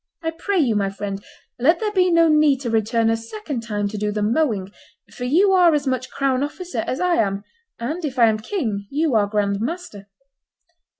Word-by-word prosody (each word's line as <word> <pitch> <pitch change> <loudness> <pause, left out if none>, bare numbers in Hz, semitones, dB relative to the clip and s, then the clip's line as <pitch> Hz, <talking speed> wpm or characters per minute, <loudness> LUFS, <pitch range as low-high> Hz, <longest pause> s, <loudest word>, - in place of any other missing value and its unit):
I 325 - -1
pray 390 +4 -2
you, 255 -10 +2
my 200 -1 +1
friend, 195 0 -5 0.4
let 320 +8 +3
there 430 -1 -1
be 370 -3 +3
no 335 -1 +5
need 300 -3 +4
to 240 -4 -3
return 225 +1 +1
a - - +2
second 265 - -6
time 210 -2 -2
to 210 0 -5
do 210 0 -1
the 210 0 -2
mowing, 215 -5 0 0.4
for 245 - -5
you 360 +10 +4
are 355 -4 +5
as 290 -1 -1
much 255 -1 -2
crown 270 -2 0
officer 295 -4 -4
as 260 - -2
I 360 -1 +2
am, 200 -2 0 0.3
and, 305 +10 -4
if 275 -4 -4
I 235 - +6
am 220 -1 +2
king, 215 - -3
you 300 0 0
are 210 -2 +3
grand 200 -1 0
master." 235 - -5
255 Hz, 205 wpm, -21 LUFS, 210-325 Hz, 0.4 s, I